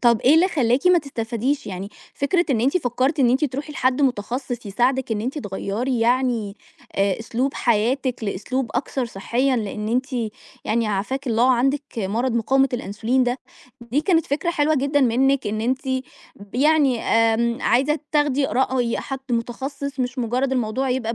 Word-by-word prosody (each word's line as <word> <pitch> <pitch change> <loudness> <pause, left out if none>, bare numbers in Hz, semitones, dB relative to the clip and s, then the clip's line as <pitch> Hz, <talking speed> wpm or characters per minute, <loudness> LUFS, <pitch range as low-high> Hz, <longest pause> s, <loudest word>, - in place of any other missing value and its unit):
طَب 235 -2 +4
إيه 270 +4 +5
اللي 355 +4 +5
خلّاكِ 265 -1 +1
ما 360 -1 +6
تستفاديش 255 0 -2
يعني؟ 190 0 -5 0.3
فكرة 345 +6 +1
إن 235 -5 +2
أنتِ 270 +8 +2
فكرتِ 265 +1 0
إن 240 -2 +5
أنتِ 265 +4 +2
ترُوحي 285 +2 -4
لحد 260 0 +1
متخصص 245 0 -2
يساعدِك، 245 +4 0
إن 210 - -1
أنتِ 260 +6 -3
تغيّري 225 +3 -2
يعني 235 -4 +1 0.4
آآ 195 0 +1
أسلوب 250 +4 -2
حياتِك 240 +2 0
لأسلوب 230 +5 -2
أكثر 265 -1 -1
صحيًا، 245 +6 0
لإن 210 -1 -3
أنتِ 250 +4 0 0.6
يعني 230 0 +1
عافاكِ 215 +8 -2
الله 235 +2 +3
عندِك 270 +4 +1 0.2
مرض 225 +6 -1
مقاومة 265 +4 +3
الأنسولين 240 +3 0
ده، 245 +2 -1 0.4
دي 235 +5 -1
كانت 330 -1 +2
فكرة 305 +5 -1
حلوة 310 -2 +2
جدًا 280 +2 +1
منِك، 265 +1 +2
إن 215 +1 -2
أنتِ 260 +4 -1 0.5
ب 200 +1 -15
يعني 280 -2 +3
آمم 230 +1 +2
عايزة 275 +6 +2
تاخدي 290 -2 +2
رأي 250 -2 0
حد 270 -1 -5
متخصص، 270 +4 -3
مش 250 +1 -2
مجرد 250 +3 0
الموضوع 255 +2 0
يبقى 235 -3 -1
250 Hz, 160 wpm, -22 LUFS, 230-275 Hz, 0.6 s, ما